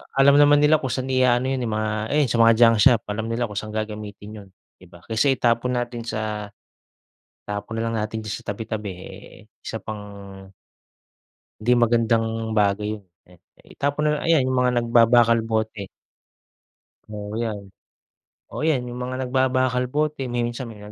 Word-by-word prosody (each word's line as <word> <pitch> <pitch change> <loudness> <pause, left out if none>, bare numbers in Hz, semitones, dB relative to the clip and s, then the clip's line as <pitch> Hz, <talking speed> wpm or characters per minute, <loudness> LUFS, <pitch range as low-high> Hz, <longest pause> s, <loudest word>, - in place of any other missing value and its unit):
alam 140 +1 +6
naman 145 0 +6
nila 155 +1 +5
kung 130 - -4
saan 130 +1 -3
i-a-ano 130 0 +2
'yon 130 - -1
eh, 115 - -2
mga 110 0 -1 0.3
ayun, 145 -4 +2
sa 115 - 0
mga 115 0 +7
junk 115 -1 +6
shop. 120 -4 +5
Alam 110 +2 -3
nila 120 +1 -1
kung 105 -1 -4
saan 110 0 -8
gagamitin 105 -1 -6
yun, 95 - -19 0.3
di 90 - -16
ba? 85 -1 -17
Kaysa 115 +5 +1
itapon 120 +1 +1
natin 120 -1 -3
sa 110 -2 -3 1.0
itapon 105 +2 -5
na - - -1
lang 115 - -3
natin 110 +1 -4
diyan 110 - -4
sa - - -20
tabi-tabi, 105 -1 -5
eh 90 - -12 0.2
isa - - -4
pang, 100 -2 -9 1.1
'di 115 +3 +1
magandang 115 -1 +1
bagay 105 +1 +1
'yon 100 - -22 0.2
eh. 90 - -18 0.4
Itapon 145 +1 -1
na 150 - -4
ayan, 160 -6 +3
yung 130 0 0
mga 125 0 +2
nagbabakal, 115 0 +4
bote. 110 -3 -2 1.2
Oo 105 0 -6
'yan. 110 -3 -3 0.9
Oo - - -5
yan, 145 -6 +2
yung 120 0 -7
mga 130 +1 -4
nagbabakal 130 -1 +1
bote. 150 -2 -1
Minsan 120 0 -3
may 110 - -12
115 Hz, 165 wpm, -23 LUFS, 105-125 Hz, 1.2 s, mga